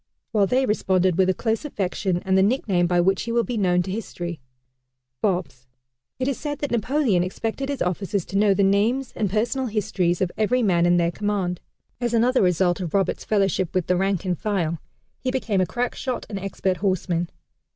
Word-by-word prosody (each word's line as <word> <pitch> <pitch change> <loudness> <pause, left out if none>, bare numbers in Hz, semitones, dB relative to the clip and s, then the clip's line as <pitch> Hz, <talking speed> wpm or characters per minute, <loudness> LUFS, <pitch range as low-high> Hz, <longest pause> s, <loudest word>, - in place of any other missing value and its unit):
While 205 -3 +3
they 260 +3 +2
responded 185 -5 +2
with 190 +1 +3
a - - +4
close 225 +2 -1
affection 190 - -2
and 190 0 +2
the 190 - +5
nickname 195 -5 +2
by 175 0 +2
which 190 +2 +2
he 230 - -4
will 235 0 +2
be 240 +4 -4
known 180 -4 +2
to 185 - -5
history 175 -5 -5 0.8
"Bobs." 175 -10 -2 0.5
It 260 - -1
is 275 - -1
said 290 -1 -3
that 290 - -3
Napoleon 240 -4 +2
expected 225 +9 -3
his 280 - -1
officers 190 +1 -2
to - - -8
know 205 -2 +4
the 200 - +2
names 220 +7 +2
and 210 -3 0
personal 240 +6 0
histories 200 -5 0
of 185 -2 0
every 245 +3 +2
man 175 -4 +3
in 175 0 +4
their 170 0 +2
command. 195 -2 -2 0.4
As 240 -1 0
another 250 +3 +3
result 180 -1 +2
of 180 -1 -3
Roberts' 195 -1 0
fellowship 195 -4 +1
with 185 -3 +1
the 180 - +2
rank 195 0 0
and 180 -1 0
file 170 -4 -1 0.4
he 255 - -2
became 235 -7 0
a 185 - +1
crack 245 0 -2
shot 255 -2 -4
and 200 - -3
expert 190 -1 -2
horseman. 180 -3 0
195 Hz, 200 wpm, -23 LUFS, 180-230 Hz, 0.8 s, the